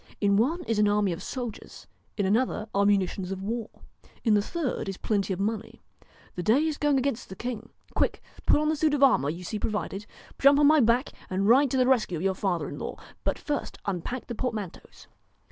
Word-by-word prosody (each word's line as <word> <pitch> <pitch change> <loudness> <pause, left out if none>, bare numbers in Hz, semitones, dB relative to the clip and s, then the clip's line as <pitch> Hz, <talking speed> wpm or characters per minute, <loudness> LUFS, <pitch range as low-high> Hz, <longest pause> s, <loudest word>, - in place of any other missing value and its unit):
In 200 -1 +3
one 300 - +1
is 225 -7 -1
an 210 - +4
army 205 -2 +2
of 170 - -4
soldiers, 245 -4 -6 0.3
in 200 - +1
another 215 +2 +1
are 200 0 +3
munitions 190 -2 +1
of 190 0 -4
war, 225 +2 -3 0.5
in 225 - +3
the 205 - +4
third 270 - -3
is 195 - -5
plenty 200 -3 -1
of 185 - -2
money. 215 +2 -3 0.5
The 180 - -4
day 240 - +3
is 310 -2 -2
going 295 -2 +3
against 260 -2 -1
the 190 - -7
king. 235 +1 -5 0.2
Quick, - - +1 0.3
put - - +5
on 305 0 +1
the 315 - +2
suit 305 -1 +2
of 280 - +2
armour 245 - +4
you 160 - -3
will 180 - -9
see 210 +4 -4
provided, 210 -1 -3 0.3
jump 280 +1 +6
on 295 - +5
my 310 +1 +6
back, 240 +2 +3 0.2
and 190 +2 0
ride 265 +5 +6
to 265 - 0
the 255 - +4
rescue 240 -9 +2
of 160 - -5
your 190 0 +2
father 185 -3 -1
in - - -7
law. - - -5 0.3
But - - 0
first 295 -2 -3
unpack 200 +6 -3
the 240 - -5
portmanteaus.' 220 -7 -5
220 Hz, 220 wpm, -27 LUFS, 195-265 Hz, 0.5 s, jump